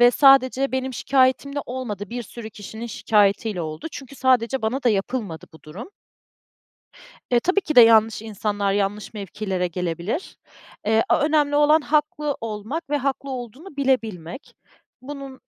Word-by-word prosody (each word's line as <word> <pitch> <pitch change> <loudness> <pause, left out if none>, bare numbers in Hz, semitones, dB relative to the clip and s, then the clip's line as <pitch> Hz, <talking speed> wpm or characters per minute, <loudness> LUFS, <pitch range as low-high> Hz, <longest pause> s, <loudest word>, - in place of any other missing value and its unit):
ve 240 0 +8
sadece 270 0 +4
benim 260 0 -2
şikâyetimle 275 +2 +1
olmadı, 215 -6 -5
bir 240 +1 -4
sürü 225 0 -9
kişinin 220 +2 -8
şikâyetiyle 210 -2 +1
oldu. 155 - -6
Çünkü 275 0 -9
sadece 255 -1 +2
bana 250 +5 -1
da 245 - +3
yapılmadı 205 -4 -2
bu 160 -2 -17
durum. 185 - -9 1.4
E, 240 - +5
tabii 370 +9 +1
ki 315 -4 -4
de 245 - +11
yanlış 225 -1 +5
insanlar, 205 -2 -2
yanlış 205 +1 -2
mevkilere 195 -3 -3
gelebilir. 175 - -4 0.5
Eee, 220 +1 +3
a - - +4
önemli 295 -1 +2
olan 295 +2 +5
haklı 300 -1 0
olmak 225 +9 -5
ve 295 - +1
haklı 275 0 -2
olduğunu 260 - -8
bilebilmek. 230 - -2 0.5
Bunun 275 -1 -8
240 Hz, 145 wpm, -23 LUFS, 210-275 Hz, 1.4 s, de